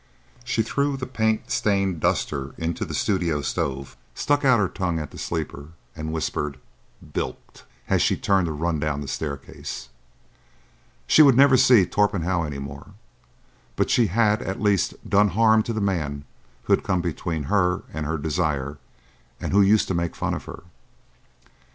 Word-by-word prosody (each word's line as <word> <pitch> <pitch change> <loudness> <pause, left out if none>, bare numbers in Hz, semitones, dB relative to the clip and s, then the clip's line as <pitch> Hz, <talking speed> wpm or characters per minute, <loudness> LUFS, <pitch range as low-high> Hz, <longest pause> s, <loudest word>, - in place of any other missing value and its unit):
She 115 -2 0
threw 140 +4 -1
the 130 - -4
paint 110 -3 -1
stained 100 -4 +1
duster 70 -2 -1
into 80 0 -2
the - - -5
studio 85 -7 0
stove, 70 0 -3 0.2
stuck 145 0 +1
out 130 -3 +5
her 105 -3 +2
tongue 90 -4 -2
at 75 -2 -5
the - - -10
sleeper, 80 -2 -5 0.2
and 80 -1 -5
whispered, 75 -3 -2 0.6
"Bilked!" - - -5 0.2
as - - +2
she - - +2
turned 95 -3 +2
to - - -2
run 80 +1 -1
down 75 -1 -2
the 70 - -6
staircase. 70 -4 -6 1.2
She - - +6
would 135 -5 +7
never 140 -1 +7
see 125 -6 +6
Torpenhow 95 -2 +1
any 75 -3 -4
more, 70 +7 -9 0.8
but - - 0
she 120 -3 +4
had 105 +2 +2
at 95 - -4
least 100 -3 +1
done 105 +1 +4
harm 110 -1 +5
to 115 - -4
the 110 - -2
man 75 -8 -2 0.4
who - - +2
had - - +2
come 90 -2 0
between 85 -2 -3
her 90 +3 +1
and 80 +1 -3
her 80 +1 -1
desire 75 -2 -2 0.6
and - - -4
who 100 - +6
used 105 +2 +4
to - - 0
make 85 -1 -2
fun - - -2
of - - -5
her. - - -9
90 Hz, 170 wpm, -24 LUFS, 75-105 Hz, 1.2 s, would